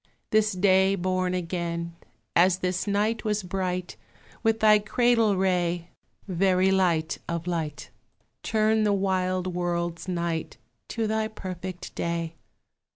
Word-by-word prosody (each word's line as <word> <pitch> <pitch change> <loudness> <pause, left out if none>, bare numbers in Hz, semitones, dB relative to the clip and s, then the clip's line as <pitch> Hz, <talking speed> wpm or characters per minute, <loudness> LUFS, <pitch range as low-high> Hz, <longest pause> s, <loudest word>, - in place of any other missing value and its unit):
This 215 -1 +3
day 190 +1 +4
born 185 0 0
again; 170 -1 -3 0.4
As 180 +1 +5
this 180 +1 -2
night 210 +2 0
was 210 -1 0
bright 180 -1 -3 0.4
With 225 -1 +2
thy 215 -1 +6
cradle 225 -1 +2
ray, 175 -2 0 0.4
Very 185 0 +2
light 170 -4 +1
of 170 -1 -2
light, 160 -4 -3 0.5
Turn 220 0 +2
the 205 -1 +3
wild 185 -2 0
world's 175 0 -2
night 170 -5 -2 0.3
To 225 -1 -2
thy 220 0 0
perfect 185 -3 -7
day. 170 -1 -2
185 Hz, 120 wpm, -26 LUFS, 175-205 Hz, 0.5 s, thy